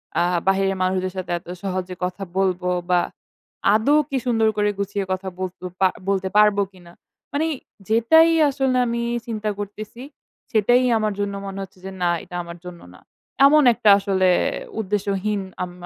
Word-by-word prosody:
অ্যা 170 Hz, -, +3 dB, 0.2 s
বাহিরের 195 Hz, 0 st, +2 dB
মানুষদের 185 Hz, 0 st, -1 dB
সাথে 185 Hz, -, -4 dB
এত 170 Hz, -, -26 dB, 0.2 s
সহজে 185 Hz, -1 st, -3 dB
কথা 180 Hz, +2 st, -3 dB
বলব 185 Hz, -2 st, +1 dB, 0.3 s
বা 180 Hz, -1 st, +4 dB, 0.7 s
আদৌ 255 Hz, +8 st, +4 dB
কি 270 Hz, -, -1 dB
সুন্দর 225 Hz, -3 st, +2 dB
করে 210 Hz, 0 st, +2 dB
গুছিয়ে 200 Hz, 0 st, -2 dB
কথা 185 Hz, +1 st, -3 dB
বলতে 185 Hz, -1 st, -5 dB, 0.2 s
পার 190 Hz, -1 st, +4 dB, 0.2 s
বলতে 190 Hz, -1 st, 0 dB
পারব 210 Hz, -1 st, +5 dB
কিনা। 175 Hz, -2 st, -16 dB, 0.4 s
মানে 295 Hz, +3 st, +1 dB, 0.4 s
যেটাই 320 Hz, +10 st, +5 dB, 0.2 s
আসলে 265 Hz, -2 st, 0 dB
আমি 235 Hz, 0 st, -1 dB, 0.2 s
চিন্তা 215 Hz, -2 st, -3 dB
করতেছি 210 Hz, +3 st, -7 dB, 0.5 s
সেটাই 245 Hz, +3 st, +4 dB
আমার 215 Hz, -1 st, 0 dB
জন্য 200 Hz, 0 st, -1 dB
মনে 195 Hz, 0 st, -6 dB
হচ্ছে 190 Hz, -1 st, -13 dB
যে 190 Hz, -, -5 dB
না 175 Hz, -, +2 dB
এটা 180 Hz, -, -10 dB
আমার 170 Hz, 0 st, -9 dB
জন্য 180 Hz, -1 st, -9 dB
না। -, -, -16 dB, 0.5 s
এমন 300 Hz, +2 st, +6 dB
একটা 215 Hz, -, +2 dB
আসলে 190 Hz, -2 st, +2 dB, 0.5 s
উদ্দেশ্যহীন 205 Hz, 0 st, -1 dB, 0.2 s
আম 180 Hz, -, -6 dB
200 Hz, 160 wpm, -22 LUFS, 185-220 Hz, 0.7 s, এমন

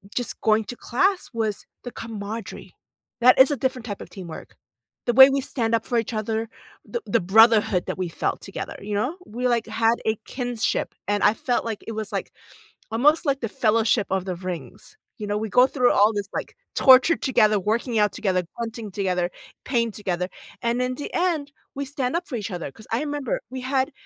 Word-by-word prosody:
just 245 Hz, -, -3 dB
going 215 Hz, 0 st, +3 dB
to 245 Hz, -, -7 dB
class 370 Hz, +10 st, 0 dB
was 220 Hz, -3 st, -2 dB, 0.2 s
the 245 Hz, -, -6 dB
camaraderie. 220 Hz, -1 st, -7 dB, 0.5 s
That 250 Hz, +2 st, +6 dB
is 265 Hz, -, +8 dB
a -, -, +1 dB
different 255 Hz, -1 st, -2 dB
type 205 Hz, -4 st, -5 dB
of -, -, -9 dB
teamwork. 175 Hz, -5 st, -9 dB, 0.5 s
The 240 Hz, -, +1 dB
way 265 Hz, +2 st, +10 dB
we 275 Hz, 0 st, +1 dB
stand 230 Hz, -4 st, 0 dB
up 225 Hz, -, -2 dB
for 240 Hz, -, 0 dB
each 230 Hz, +1 st, -4 dB
other, 220 Hz, +1 st, -2 dB, 0.4 s
the 475 Hz, -, -4 dB
the 230 Hz, -, +2 dB
brotherhood 210 Hz, 0 st, +5 dB
that -, -, -3 dB
we 180 Hz, -2 st, -1 dB
felt -, -, -2 dB
together, -, -, -6 dB
you 205 Hz, +1 st, -4 dB
know? 255 Hz, +11 st, -1 dB
We, 245 Hz, +3 st, -2 dB
like, 235 Hz, -2 st, +1 dB
had 225 Hz, +1 st, +2 dB
a 220 Hz, -, +2 dB
kinship, 245 Hz, -4 st, -2 dB
and 205 Hz, 0 st, 0 dB
I 205 Hz, -, +6 dB
felt 245 Hz, +2 st, -1 dB
like 220 Hz, -2 st, -4 dB
it -, -, -3 dB
was, 215 Hz, -1 st, -5 dB
like, 195 Hz, -, -3 dB, 0.6 s
almost 295 Hz, +9 st, +3 dB
like 275 Hz, -2 st, +1 dB
the 230 Hz, -, -2 dB
Fellowship 220 Hz, 0 st, +2 dB
of 190 Hz, -1 st, 0 dB
the 185 Hz, -2 st, -3 dB
Rings, 175 Hz, -8 st, -7 dB, 0.2 s
you 210 Hz, -, -4 dB
know? 205 Hz, 0 st, 0 dB
We 220 Hz, +1 st, -3 dB
go 250 Hz, +5 st, +6 dB
through 250 Hz, -2 st, +2 dB
all 210 Hz, +2 st, +5 dB
this, 205 Hz, -1 st, -3 dB
like, -, -, -5 dB, 0.2 s
torture 265 Hz, +5 st, +7 dB
together, 215 Hz, -6 st, +3 dB
working 225 Hz, +4 st, 0 dB
out 210 Hz, 0 st, +3 dB
together, 185 Hz, -3 st, 0 dB
grunting 225 Hz, -2 st, -5 dB
together, 180 Hz, -2 st, -1 dB, 0.3 s
pain 235 Hz, -3 st, +1 dB
together, 180 Hz, -4 st, -2 dB, 0.3 s
and 235 Hz, +1 st, 0 dB
in 250 Hz, 0 st, -1 dB
the 290 Hz, -, -6 dB
end, 330 Hz, -5 st, 0 dB, 0.2 s
we 280 Hz, +1 st, -3 dB
stand 265 Hz, 0 st, -2 dB
up 350 Hz, -, -5 dB
for 260 Hz, -, -5 dB
each 215 Hz, -1 st, -5 dB
other, 175 Hz, -5 st, -4 dB
'cause 215 Hz, -, -16 dB
I 225 Hz, -, +1 dB
remember 290 Hz, -, -2 dB
we 260 Hz, 0 st, -6 dB
had 265 Hz, +2 st, 0 dB
225 Hz, 205 wpm, -24 LUFS, 210-255 Hz, 0.6 s, way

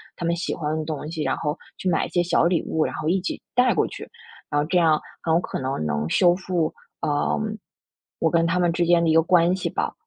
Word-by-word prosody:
他 170 Hz, -, -5 dB
们 170 Hz, 0 st, +1 dB
喜 170 Hz, -, -3 dB
欢 155 Hz, -1 st, -2 dB
的 160 Hz, -, -2 dB
东 150 Hz, -1 st, -5 dB
西， 160 Hz, -2 st, -4 dB
然 -, -, 0 dB
后 150 Hz, -1 st, -2 dB, 0.2 s
去 -, -, -4 dB
买 165 Hz, -, +1 dB
一 -, -, -8 dB
些 175 Hz, -, +1 dB
小 175 Hz, -, +2 dB
礼 170 Hz, -1 st, +2 dB
物， 160 Hz, -, 0 dB
然 -, -, -4 dB
后 155 Hz, -, -4 dB
一 185 Hz, +2 st, +1 dB
起 185 Hz, -, -4 dB
带 250 Hz, 0 st, +4 dB
过 -, -, +2 dB
去， -, -, -9 dB, 0.4 s
然 145 Hz, -, +1 dB
后 150 Hz, -, 0 dB
这 180 Hz, -, +1 dB
样 160 Hz, -3 st, +4 dB, 0.2 s
很 165 Hz, -, -1 dB
有 -, -, +4 dB
可 -, -, -4 dB
能 130 Hz, -, -2 dB
能 75 Hz, +1 st, -1 dB
修 175 Hz, -, +4 dB
复， 180 Hz, -4 st, -1 dB, 0.3 s
呃， 145 Hz, -1 st, 0 dB, 0.8 s
我 165 Hz, -, +2 dB
跟 165 Hz, -1 st, +3 dB
他 170 Hz, +2 st, +1 dB
们 175 Hz, -1 st, +2 dB
之 175 Hz, 0 st, +1 dB
间 170 Hz, -1 st, +4 dB
的 165 Hz, -, +2 dB
一 -, -, +4 dB
个 165 Hz, -, +6 dB
关 175 Hz, +1 st, +3 dB
系 185 Hz, -, -3 dB
吧。 -, -, -2 dB
165 Hz, 280 characters per minute, -23 LUFS, 155-175 Hz, 0.8 s, 个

